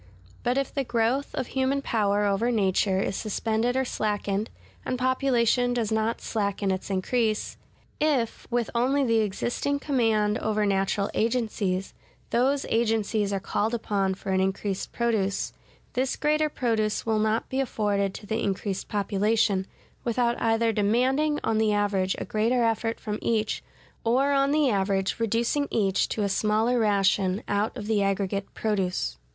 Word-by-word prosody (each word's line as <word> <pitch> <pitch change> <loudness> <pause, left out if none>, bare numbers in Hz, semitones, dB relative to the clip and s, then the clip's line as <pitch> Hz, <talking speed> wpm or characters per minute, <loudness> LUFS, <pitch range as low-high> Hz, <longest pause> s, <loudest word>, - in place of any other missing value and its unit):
But 245 +2 0
if 275 - -1
the 275 - 0
growth 240 +3 0
of 260 - -1
human 265 +2 0
power 205 -3 +1
over 205 +4 +1
nature 195 -3 +2
is 195 - -1
suspended 225 +3 -1
or 265 - +1
slackened, 210 -2 -1 0.3
and 255 - -2
population 245 -1 +2
does 225 -3 -1
not 220 +1 0
slacken 200 -2 -1
its 185 +1 -3
increase; 215 +3 0 0.4
if, 280 -7 0
with 240 -1 -1
only 260 +4 +2
the 230 -3 +3
existing 240 +7 -1
command 225 -7 +1
over 215 -1 0
natural 200 0 0
agencies, 215 -5 -1 0.4
those 270 +4 +2
agencies 220 -2 +1
are 195 - 0
called 215 +4 -1
upon 200 -4 0
for 190 +1 -5
an 190 - +2
increased 190 0 -2
produce; 220 -5 0 0.4
this 260 +1 0
greater 305 0 +1
produce 225 -6 -1
will 220 -1 +1
not 215 +1 +1
be 260 - -2
afforded 205 -6 0
to - - -9
the 220 +2 -2
increased 195 -1 -2
population, 205 -1 +1 0.4
without 235 0 +1
either 225 0 +2
demanding 260 +9 +2
on 220 -1 +1
the 215 -1 +2
average 200 -2 +1
a - - -4
greater 235 +3 +1
effort 225 0 0
from 210 -1 -4
each, 220 -2 0 0.4
or 260 +5 +2
on 275 0 +3
the 300 0 +3
average 195 -3 0
reducing 235 +6 +1
each 195 -3 +1
to 215 - -1
a - - +2
smaller 215 +4 +1
ration 195 -2 +2
out 205 +4 -1
of 210 - -5
the 215 -1 +1
aggregate 195 0 -1
produce. 195 -4 -1
220 Hz, 155 wpm, -26 LUFS, 200-245 Hz, 0.4 s, the